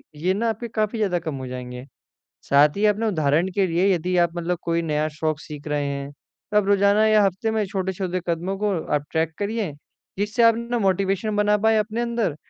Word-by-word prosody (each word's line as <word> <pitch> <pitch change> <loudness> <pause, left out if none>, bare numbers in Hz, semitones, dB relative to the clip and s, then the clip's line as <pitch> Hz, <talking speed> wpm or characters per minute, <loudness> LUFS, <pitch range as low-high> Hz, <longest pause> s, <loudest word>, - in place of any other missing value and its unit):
ये 175 +5 0
ना 230 +2 0
आपके 225 +2 -4
काफ़ी 215 0 -1
ज़्यादा 185 -5 +1
कम 160 -3 -5
हो 130 -1 -6
जाएँगे। 125 0 -7 0.6
साथ 145 +4 +5
ही 210 - +2
आप 210 - +3
अपने 225 +1 -1
उदाहरण 160 -1 +1
के 195 -2 +2
लिए 185 +3 +2
यदि 180 +2 -1
आप 170 -1 +3
मतलब 175 +1 -1
कोई 170 0 0
नया 155 -1 0
शौक 155 0 -2
सीख 150 -1 -9
रहे 145 -1 -1
हैं, 140 0 -4
तो 210 +7 -6
आप 210 - +3
रोज़ाना 200 +1 +4
या 215 -1 +5
हफ़्ते 195 +4 -1
में 220 -1 0
छोटे-छोटे 185 -2 -2
कदमों 175 +3 -2
को 205 -1 0 0.2
आप 145 - -2
ट्रैक 160 0 0
करिए, 205 -4 -2 0.5
जिससे 210 +3 +1
आप 230 -1 +6
ना 235 +1 -2
मोटिवेशन 195 +1 0
बना 210 0 +3
पाएँ 220 0 +4
अपने 215 +2 -2
अंदर। 235 -9 -1
190 Hz, 210 wpm, -23 LUFS, 160-210 Hz, 0.6 s, आप